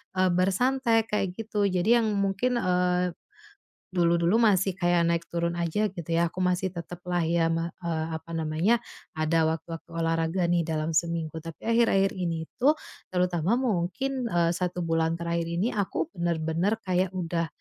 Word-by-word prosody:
eee, 185 0 +3
bersantai, 225 +5 +2
kayak 195 -3 -1
gitu. 210 -2 -1
Jadi 185 +5 +3
yang 225 - +1
mungkin, 200 +5 +1
eee, 180 -1 +1 0.8
dulu-dulu 170 +3 +3
masih 195 -3 +3
kayak 175 -2 +2
naik 170 0 +1
turun 170 0 -1
aja 175 +5 0
gitu 175 -4 -7
ya, 170 +1 +3
aku - - -8
masih 180 +1 +1
tetaplah 175 +1 -3
ya 165 0 +2
me 165 0 -1
apa 160 0 -3
namanya, 165 +9 +1 0.4
ada 160 +1 +2
waktu-waktu 165 +1 -4
olahraga 165 +2 0
nih, 170 -1 +2
dalam 160 0 -1
seminggu. 165 -1 -1
Tapi 165 -1 -9
akhir-akhir 225 -4 +3
ini 165 -3 -2
tuh, 290 +5 +5 0.4
terutama 180 +2 +1
mungkin, 250 +4 -1
eee, 170 -4 +2
1 180 -1 -2
bulan 165 0 +1
terakhir 170 0 -1
ini, 175 +8 0
aku 190 -5 -1
bener-bener 170 +3 0
kayak 185 -1 +1
udah, 170 -2 -1
175 Hz, 150 wpm, -27 LUFS, 165-195 Hz, 0.8 s, tuh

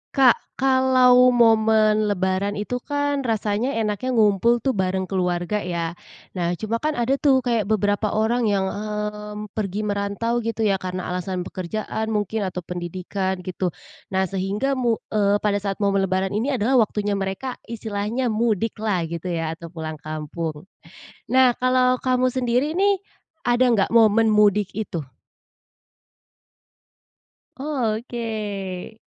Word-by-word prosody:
Kak, 260 -3 +3
kalau 255 -1 +5
momen 220 -3 +4
lebaran 195 0 0
itu 210 +5 -3
kan 285 +1 -1
rasanya 225 +1 -1
enaknya 225 +3 -1
ngumpul 220 +2 +3
tuh 270 - +2
bareng 190 -3 -1
keluarga, 180 +1 0
ya? 170 -3 -3 0.4
Nah, 175 -1 -1
cuma 220 +5 -2
kan 305 +2 -1
ada 255 +3 0
tuh 265 -3 +3
kayak 230 -5 0
beberapa 205 0 +1
orang 225 +2 +1
yang, 200 -2 +2
mmm, 210 0 -5
pergi 205 0 -3
merantau 205 +3 -1
gitu 230 -1 -2
ya, 195 -3 +2
karena 185 0 -4
alasan 180 0 -3
pekerjaan 215 +5 -4
mungkin, 210 0 -1
atau 180 -1 -5
pendidikan, 180 +2 -4
gitu. 185 -1 -3 0.3
Nah, 190 0 0
sehingga 195 +7 -1
mu 245 -4 +1 0.2
eee, 205 -1 +3
pada 205 -1 +2
saat 200 0 -3
momen 195 -1 +2
lebaran 190 +1 0
ini 215 +5 -1
adalah 250 +3 +3
waktunya 210 -2 0
mereka 195 +7 -4
istilahnya 225 +2 -2
mudik 220 -1 0
lah, 205 -5 0
gitu 170 +2 -5
ya, 165 -2 -2
atau 170 +1 -8
pulang 160 -2 -6
kampung. 155 0 -5 0.7
Nah, 255 -2 +5
kalau 255 0 +3
kamu 255 0 +1
sendiri 255 +5 0
nih, 395 0 +3 0.5
ada 240 +1 +4
enggak 200 -4 +2
momen 225 -1 +4
mudik 210 -2 +4
itu? 205 -6 -3 2.6
Oh, 260 -6 -1
oke. 215 -4 -5
210 Hz, 135 wpm, -23 LUFS, 190-240 Hz, 2.6 s, kalau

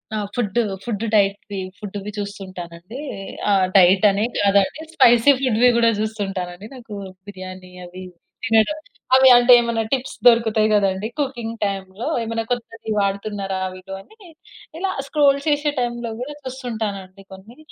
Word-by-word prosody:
ఆ! - - -1 0.2
Food, 230 -3 -2 0.3
food 230 -2 -3
diet, 200 -1 +3 0.4
ఫుడ్‌వి 205 0 -6
చూస్తుంటాను 190 -4 -7
అండి. 185 +9 -11 0.5
ఆహ్, 195 -2 +4
డైట్ 185 +2 +5
అనే 200 +2 0
కాదండి 200 +8 +2
స్పైసీ 240 +1 +6
ఫుడ్‌వి 250 -2 +3
కూడా 230 -1 +4
చూస్తుంటాను 200 -4 -3
అండి. 200 +4 -11
నాకు 230 -5 -10 0.3
బిర్యానీ 185 -2 -9
అవి 185 +1 -10 0.4
తినడం 225 +6 +3 0.4
అవి 265 0 +7
అంటే 245 +1 +5
ఏమన్నా 235 -1 -1
టిప్స్ 265 -1 -1
దొరుకుతాయి 225 -2 +4
కదండీ 200 0 +1
కుకింగ్ 240 -5 -3
టైమ్‌లో 195 +2 -4 0.2
ఏమైనా 225 0 -3
కొత్తది 230 -2 -4
వాడుతున్నారా 200 -1 -2 0.4
అని. 435 - -18 0.5
ఇలా 380 +2 -1 0.2
స్క్రోల్ 280 -2 +3
చేసే 295 0 +1
టైమ్‌లో 240 -1 -3
కూడా 295 +4 -5
చూస్తుంటాను 230 -6 -4
అండి 185 +1 -17
కొన్ని. 205 +7 -13
215 Hz, 135 wpm, -21 LUFS, 195-240 Hz, 0.5 s, అవి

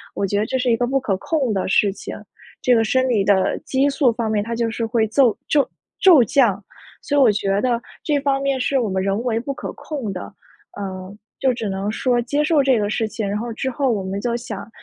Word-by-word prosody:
我 200 - 0
觉 200 +2 -1
得 210 - 0
这 260 +3 -1
是 250 -1 +1
一 - - +4
个 245 - 0
不 270 +1 +1
可 205 -7 -1
控 265 - -1
的 190 - -1
事 200 +1 +3
情。 - - -8 0.5
这 250 - +3
个 225 - +3
生 260 +4 +1
理 225 -6 +2
的 195 -1 +2
激 270 +1 0
素 275 -3 +2
方 230 -1 -2
面 210 -1 +1
它 230 +2 -4
就 230 0 0
是 230 - -3
会 225 -1 +1
奏 240 0 +3
骤 285 -2 +2 0.3
骤 345 -10 +7
降， 215 -4 +2 0.4
所 290 - -1
以 285 - +5
我 240 -5 +6
觉 200 -1 0
得 240 -1 +1 0.2
这 295 -2 +1
方 275 -1 +1
面 275 -1 0
是 270 +1 +1
我 230 -4 -1
们 190 0 -1
人 195 +2 0
为 230 -3 0
不 275 +4 -4
可 - - -6
控 270 -9 -5
的。 185 - -7 0.4
呃， 190 0 -6 0.2
就 260 -2 +2
只 225 -3 -4
能 195 +1 -2
说 245 +2 +1
接 290 +5 0
受 300 -2 +3
这 265 -4 +3
个 205 -1 -1
事 220 +1 -1
情， 215 -1 -4
然 205 - -1
后 235 +1 -4
之 265 +4 -2
后 265 0 0
我 210 -4 -1
们 190 +1 -3
就 235 +2 -1
想 230 -5 -6
230 Hz, 265 characters per minute, -21 LUFS, 205-265 Hz, 0.5 s, 骤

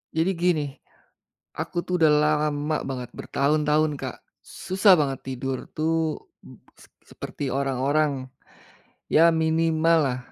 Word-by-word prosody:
Jadi 165 +4 +2
gini, 170 -4 +2 0.9
aku 175 - -4
tuh 180 -1 -2
udah 155 -2 +5
lama 150 0 0
banget 125 -3 -5
bertahun-tahun, 150 +2 0
Kak, - - -6 0.2
susah 190 +1 +3
banget 135 -4 -2
tidur 130 0 -4
tuh 160 0 -1 0.2
b - - -15 0.2
s - - -17 0.2
seperti 140 - -6
orang-orang, 135 0 0 0.8
ya 165 +2 +6
minimal 160 0 +2
lah 125 -1 -2
155 Hz, 115 wpm, -24 LUFS, 140-160 Hz, 0.9 s, ya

